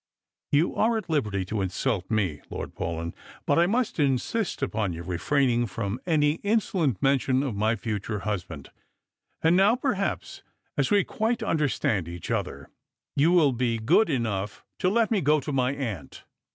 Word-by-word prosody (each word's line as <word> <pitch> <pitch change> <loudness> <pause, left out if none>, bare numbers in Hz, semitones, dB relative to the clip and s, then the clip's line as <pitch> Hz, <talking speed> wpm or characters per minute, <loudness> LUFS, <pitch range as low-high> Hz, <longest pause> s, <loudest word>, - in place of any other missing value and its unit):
" - - -65
You 150 +4 +2
are 225 +1 +2
at 210 -6 -5
liberty 105 -11 0
to 105 +2 -2
insult 95 +1 -1
me. 95 -9 0
Lord - - -6
Paulyn, 85 0 -4 0.3
but - - +3
I 170 - +4
must 230 -1 0
insist 145 - 0
upon 110 -8 -1
your 85 +1 -6
refraining 120 - +1
from 100 +2 -3
any 150 -1 +2
insolent 190 - +1
mention 135 -1 +2
of 135 -5 -2
my 110 +3 +1
future 105 -1 -3
husband. 90 -8 -5 0.7
And 165 +2 +5
now, 200 +5 +5
perhaps, 230 -7 -2 0.3
as 140 -2 +1
we 205 -2 +4
quite 225 +2 -1
understand 145 - 0
each 85 0 -6
other, - - -3 0.4
you 155 +5 +4
will 165 -6 +5
be 120 -2 0
good 115 - +3
enough 105 -7 -2
to 185 - +2
let 225 +2 +2
me 210 -4 +2
go 150 +2 +3
to 145 - -5
my 130 -2 +1
aunt." 110 - -5
130 Hz, 165 wpm, -26 LUFS, 105-170 Hz, 0.7 s, And